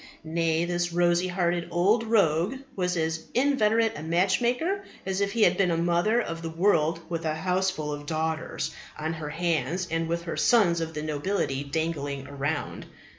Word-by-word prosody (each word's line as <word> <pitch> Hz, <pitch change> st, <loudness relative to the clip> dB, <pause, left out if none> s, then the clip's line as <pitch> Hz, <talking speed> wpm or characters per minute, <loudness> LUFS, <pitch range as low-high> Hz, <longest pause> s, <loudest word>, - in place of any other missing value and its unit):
Nay, 165 Hz, +1 st, 0 dB
this 175 Hz, 0 st, -1 dB
rosy 175 Hz, +1 st, +2 dB
hearted 175 Hz, -1 st, 0 dB
old 195 Hz, +7 st, +3 dB
rogue 200 Hz, -, +2 dB, 0.2 s
was 180 Hz, -2 st, 0 dB
as 160 Hz, 0 st, -2 dB
inveterate 230 Hz, -4 st, +3 dB
a 145 Hz, -, -6 dB
matchmaker 240 Hz, -, +1 dB, 0.2 s
as 190 Hz, +1 st, -1 dB
if 200 Hz, 0 st, 0 dB
he 230 Hz, -2 st, +3 dB
had 180 Hz, -1 st, +4 dB
been 195 Hz, -2 st, +3 dB
a 165 Hz, -, +1 dB
mother 175 Hz, +7 st, +2 dB
of 165 Hz, -8 st, -3 dB
the 165 Hz, -, -4 dB
world 165 Hz, -2 st, +2 dB
with 165 Hz, -1 st, -3 dB
a 155 Hz, -1 st, -1 dB
houseful 180 Hz, -2 st, -1 dB
of 145 Hz, 0 st, -7 dB
daughters 160 Hz, 0 st, -2 dB, 0.3 s
on 160 Hz, +1 st, -2 dB
her 160 Hz, -2 st, -5 dB
hands 170 Hz, +1 st, -1 dB
and 165 Hz, 0 st, 0 dB
with 170 Hz, +1 st, -2 dB
the 165 Hz, -, -3 dB
sons 180 Hz, -8 st, +4 dB
of 160 Hz, -1 st, -4 dB
the 150 Hz, -, -3 dB
nobility 150 Hz, -2 st, -1 dB
dangling 145 Hz, -2 st, -3 dB
around. 145 Hz, +2 st, -3 dB
170 Hz, 175 wpm, -27 LUFS, 160-190 Hz, 0.3 s, had